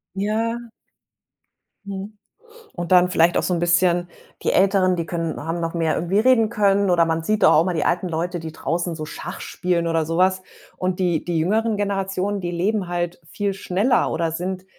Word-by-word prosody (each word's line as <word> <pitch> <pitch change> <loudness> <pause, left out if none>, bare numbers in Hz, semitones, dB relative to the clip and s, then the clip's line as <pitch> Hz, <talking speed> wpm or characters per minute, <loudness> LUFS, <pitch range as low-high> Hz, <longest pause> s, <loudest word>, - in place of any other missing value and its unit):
Ja. 225 +4 -2 1.1
Mhm. 200 +1 -7 0.6
Und 175 0 -5
dann 180 0 +6
vielleicht 175 -1 +3
auch - - +1
so 180 - 0
'n 170 - 0
bisschen 175 0 +2 0.3
die - - +1
Älteren, 190 -1 +3
die 170 -2 -3
können 165 -1 -3
haben 165 +2 -3
noch 165 0 -3
mehr 165 -2 0
irgendwie 175 +5 0
reden 225 -2 +4
können. 200 -3 +2
Oder 170 -2 +4
man 165 0 -1
sieht 215 +5 0
doch - - +7
auch 155 - +6
immer 180 0 -1
die 160 - 0
alten 175 +2 +1
Leute, 175 +1 -2
die 160 -1 -7
draußen 170 +1 -2
so 155 -1 -5
Schach - - -7
spielen 175 -2 -1
oder 165 -1 +1
so 165 +2 -2
was. 185 0 +3 0.4
Und 185 0 -2
die 175 -4 +1
die 170 -2 0
jüngeren 215 +6 +1
Generationen, 200 0 -1
die 175 -2 -4
leben 190 +3 -1
halt 175 0 -3
viel 205 -1 -2
schneller 195 +6 +1
oder 165 0 -1
sind, 185 +3 -4
180 Hz, 195 wpm, -22 LUFS, 170-200 Hz, 1.1 s, doch